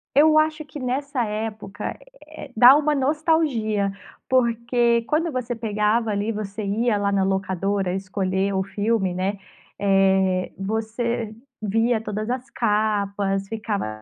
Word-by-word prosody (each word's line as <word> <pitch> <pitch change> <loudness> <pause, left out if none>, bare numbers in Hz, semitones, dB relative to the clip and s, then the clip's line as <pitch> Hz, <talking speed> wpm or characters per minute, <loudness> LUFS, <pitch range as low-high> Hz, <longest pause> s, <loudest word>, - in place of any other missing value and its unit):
Eu 310 +2 +6
acho 310 0 +2
que 295 0 -9
nessa 260 0 -1
época, 215 -1 -5 0.3
eh, - - -10
dá 245 +4 +9
uma 300 0 +2
nostalgia, 275 -8 +1 0.4
porque 235 -1 +2
quando 325 +2 +1
você 250 -2 -3
pegava, 220 0 0
ali, 205 +2 -1
você 210 0 -5
ia 210 +2 +1
lá 200 0 0
na 195 -1 +2
locadora 190 0 -1
escolher 190 0 -1
o 190 - +1
filme, 205 0 0
né, 190 +2 -2 0.4
eh, 190 -2 +2
você 220 +3 -2 0.3
via 225 +3 +2
todas 215 0 -4
as 255 +1 -3
capas, 200 -3 0
ficava 205 - -4
215 Hz, 130 wpm, -23 LUFS, 195-245 Hz, 0.4 s, dá